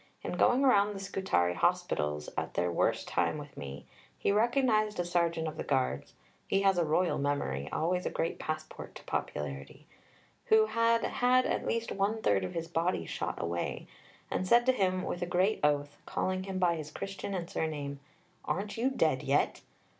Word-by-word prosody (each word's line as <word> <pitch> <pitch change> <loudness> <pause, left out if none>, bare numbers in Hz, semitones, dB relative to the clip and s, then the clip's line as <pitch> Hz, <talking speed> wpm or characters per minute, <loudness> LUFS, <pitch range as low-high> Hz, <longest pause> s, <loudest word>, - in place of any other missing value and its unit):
In - - -3
going 255 +3 +3
round 205 -6 +4
the - - -5
Scutari 190 - 0
Hospitals 75 -3 0
at - - -3
their 90 0 +1
worst - - +1
time - - 0
with 145 -1 -9
me, 70 0 -7 0.3
he - - +1
recognized 215 -2 +2
a 175 - +1
sergeant 170 -2 0
of 155 - -5
the - - -3
Guards 130 - -1 0.3
(he 195 0 +2
has 195 -2 +4
a - - +3
royal 165 +3 +1
memory, 75 - -1
always 180 +3 0
a - - 0
great 165 - -2
passport 155 0 -5
to - - -10
popularity) 70 -2 -4 0.6
who 220 0 +5
had 230 +1 +2
had 250 +1 +3
at - - -1
least 230 0 -1
one 200 +3 0
third 100 -2 +3
of 90 - -5
his 165 0 -3
body 165 - 0
shot - - -4
away, 85 0 -3 0.5
and 185 - -1
said 240 +4 +5
to 260 - +5
him 185 -6 0
with 175 - -3
a 175 - -1
great 185 +4 +2
oath, 145 -1 +1
calling 185 0 -1
him 190 -1 -4
by 175 -2 +3
his 155 -1 -6
Christian 195 +3 -5
and 170 -2 -3
surname, 145 -4 -3 0.5
'Aren't 200 +3 -2
you 245 +4 +2
dead 265 - +1
yet?' - - +1
175 Hz, 185 wpm, -31 LUFS, 145-205 Hz, 0.6 s, who